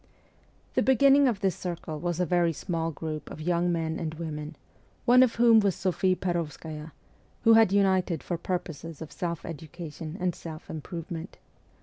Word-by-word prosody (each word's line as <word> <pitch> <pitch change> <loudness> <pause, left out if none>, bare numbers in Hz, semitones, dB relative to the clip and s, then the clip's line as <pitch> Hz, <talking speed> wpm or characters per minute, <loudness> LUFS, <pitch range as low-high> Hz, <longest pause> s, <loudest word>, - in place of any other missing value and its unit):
The - - +2
beginning 275 +2 +5
of 225 -6 0
this 190 -4 +1
circle 170 -4 -5
was 175 0 -2
a 180 - +2
very 175 0 +2
small 165 0 -2
group 155 0 -5
of - - -8
young 175 +2 +1
men 165 -1 -1
and 160 -1 -3
women 155 -1 -5 0.5
one 250 +1 +7
of 250 -3 +4
whom 235 -1 +6
was 200 -3 +2
Sophie 185 0 +1
Per6vskaya 160 -3 -4 0.5
who 225 -1 +7
had 225 -4 +6
united 190 -4 +2
for 175 -2 -3
purposes 165 -3 -4
of 155 - -11
self 170 -4 -4
education 160 0 -7
and 180 -1 0
self 160 -1 -9
improvement. 165 +2 -6
170 Hz, 160 wpm, -28 LUFS, 160-190 Hz, 0.5 s, one